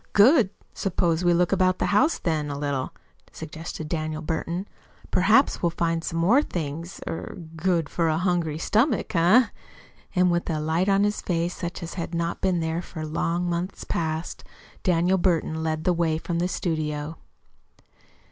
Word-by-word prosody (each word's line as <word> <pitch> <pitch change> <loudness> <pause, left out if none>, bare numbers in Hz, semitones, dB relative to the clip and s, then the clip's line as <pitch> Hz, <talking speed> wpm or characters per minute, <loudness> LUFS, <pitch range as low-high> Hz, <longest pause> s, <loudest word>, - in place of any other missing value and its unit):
"Good! 225 - +6 0.2
Suppose 170 -3 0
we 175 - +4
look 175 0 +2
about 185 -1 +3
the - - 0
house, 305 +11 +4
then, 155 -3 -1
a 140 - -4
little," 140 -2 -2 0.4
suggested 160 0 -7
Daniel 155 0 -3
Burton. 170 +4 -3 0.4
"Perhaps - - +4
we'll 170 - +3
find 165 0 -1
some 165 - -3
more 205 +12 +5
things 165 - -5
er 165 - -5 0.2
good 165 -1 +1
for 165 +3 0
a 155 - +1
hungry 170 -3 0
stomach, 220 - +1
eh?" 205 +8 +5 0.7
And 180 -1 +4
with 175 0 0
a 155 -2 0
light 160 +5 +1
on 195 0 +4
his 205 0 0
face 170 0 -1
such 175 0 -5
as 170 - -6
had 170 -1 -4
not 170 0 -2
been 185 -3 +1
there 160 +1 -1
for 160 -3 -7
long 170 +3 -1
months 175 +2 -3
past, 160 0 -3 0.4
Daniel 180 +1 +2
Burton 165 -3 +1
led 160 -1 -1
the 180 - +3
way 165 -2 +1
from 170 +1 -3
the 175 - +1
studio. 155 -3 -2
170 Hz, 165 wpm, -25 LUFS, 160-180 Hz, 0.7 s, Good